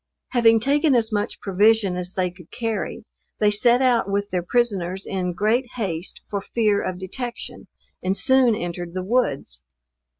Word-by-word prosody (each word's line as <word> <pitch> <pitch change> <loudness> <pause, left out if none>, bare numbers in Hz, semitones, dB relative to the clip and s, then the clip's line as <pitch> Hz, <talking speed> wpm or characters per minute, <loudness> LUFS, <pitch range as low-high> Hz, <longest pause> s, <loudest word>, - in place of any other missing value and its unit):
Having 225 -2 +4
taken 285 +3 +2
as 230 -1 +1
much 205 -1 -2
provision 205 0 +3
as 180 +1 -5
they 180 -1 0
could 175 -2 -16
carry, 225 -3 -4 0.3
they 210 -1 +3
set 240 +5 +4
out 240 -6 +2
with 200 +1 -1
their 180 -1 0
prisoners 190 -3 0
in 180 -2 -2
great 225 +8 +1
haste, 185 -7 -4
for 200 -1 -3
fear 210 -1 +1
of 185 - -3
detection, 235 +6 -7 0.3
and 190 +2 0
soon 260 -3 +4
entered 175 -2 -5
the 185 - -2
woods. 165 - -1
205 Hz, 160 wpm, -23 LUFS, 180-235 Hz, 0.3 s, Having